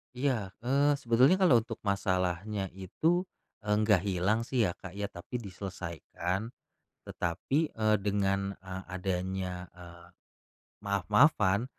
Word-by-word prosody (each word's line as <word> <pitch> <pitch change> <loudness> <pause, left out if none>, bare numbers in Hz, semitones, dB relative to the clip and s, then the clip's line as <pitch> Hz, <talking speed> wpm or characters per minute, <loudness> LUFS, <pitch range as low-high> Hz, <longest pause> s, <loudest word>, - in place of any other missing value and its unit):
Iya, 125 -6 0 0.2
eee, 140 +3 +3
sebetulnya 130 +5 +4
kalo 175 -11 +5
untuk 115 +1 -6
masalahnya 95 0 -1
itu, 160 - 0 0.3
eee, 105 -1 0
nggak 105 -4 +5
hilang 95 +4 +1
sih 125 -3 +2
ya 90 - +2
Kak 95 +1 -10
ya 100 -1 -3
tapi 90 +8 -9
diselesaikan. 90 +1 -4 0.6
Tetapi, 130 - -1
eee, 110 -1 +2
dengan, 100 -1 0
eee, 95 0 -7
adanya, 90 0 -3
eee, 85 -1 -13 0.8
maaf-maafan 100 - +3
100 Hz, 115 wpm, -30 LUFS, 90-115 Hz, 0.8 s, kalo